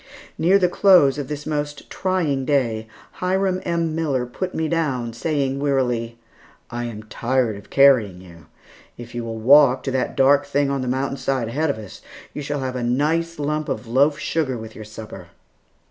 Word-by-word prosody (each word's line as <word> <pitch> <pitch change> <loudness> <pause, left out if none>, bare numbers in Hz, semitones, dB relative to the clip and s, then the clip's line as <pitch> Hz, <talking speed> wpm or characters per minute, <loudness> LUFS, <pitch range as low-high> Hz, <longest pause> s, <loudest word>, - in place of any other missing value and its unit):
Near 185 +4 +4
the 185 -2 +3
close 175 -7 +5
of 140 - -4
this 150 +1 -6
most 145 -1 -4
trying 170 -8 -1
day, 120 -6 0 0.3
Hiram 185 0 0
M. 170 -2 -1
Miller 145 -6 -1
put 180 +10 -5
me 160 0 0
down, 135 -8 -1
saying 140 +1 -1
wearily, 125 -5 -1 0.5
"I 120 0 -3
am 110 -2 -7
tired 120 +1 -1
of 100 - -13
carrying 125 -10 +4
you. 85 -4 -15 0.5
If 120 -1 -10
you 120 -1 -4
will 115 -1 -5
walk 130 +2 +5
to 135 - -2
that 130 -1 -2
dark 140 +1 +4
thing 140 0 +1
on 140 -1 -1
the 130 - -3
mountain 135 +2 -1
side 130 -5 -1
ahead 150 +6 0
of 140 - -1
us, 105 -3 -10 0.3
you - - -5
shall 145 0 -3
have 130 -1 -3
a 125 - -3
nice 155 +7 0
lump 150 +1 -2
of 110 - -3
loaf 140 +6 +2
sugar 140 -6 -1
with 110 -1 -9
your 110 - -9
supper." 105 -4 -10
135 Hz, 185 wpm, -22 LUFS, 120-150 Hz, 0.5 s, close